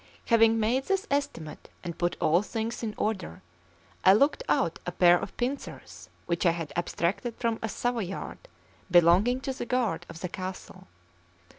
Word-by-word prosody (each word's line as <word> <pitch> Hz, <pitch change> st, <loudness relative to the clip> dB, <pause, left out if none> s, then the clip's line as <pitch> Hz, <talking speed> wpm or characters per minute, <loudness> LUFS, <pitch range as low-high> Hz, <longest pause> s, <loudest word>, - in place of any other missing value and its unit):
Having 225 Hz, -1 st, +4 dB
made 245 Hz, +5 st, +1 dB
this 390 Hz, 0 st, 0 dB
estimate 280 Hz, -, -3 dB
and 170 Hz, -2 st, -5 dB
put 175 Hz, 0 st, -1 dB
all 170 Hz, +4 st, +3 dB
things 225 Hz, +2 st, -4 dB
in 220 Hz, -3 st, -4 dB
order, 190 Hz, -, -3 dB, 0.6 s
I 190 Hz, -, +8 dB
looked 280 Hz, -, +3 dB
out -, -, +1 dB
a -, -, -1 dB
pair 175 Hz, -1 st, +5 dB
of -, -, -7 dB
pincers 255 Hz, +3 st, -5 dB, 0.2 s
which 170 Hz, -1 st, -1 dB
I 175 Hz, -, +5 dB
had 165 Hz, -3 st, -3 dB
abstracted 180 Hz, +7 st, -1 dB
from 230 Hz, -2 st, -1 dB
a 225 Hz, -, -2 dB
Savoyard 225 Hz, -5 st, -3 dB, 0.5 s
belonging 180 Hz, +9 st, +5 dB
to 270 Hz, -, -3 dB
the 255 Hz, -, -6 dB
guard 250 Hz, -4 st, -1 dB
of 165 Hz, 0 st, -10 dB
the 180 Hz, -, -2 dB
castle. 185 Hz, 0 st, -7 dB
210 Hz, 160 wpm, -28 LUFS, 175-240 Hz, 0.6 s, I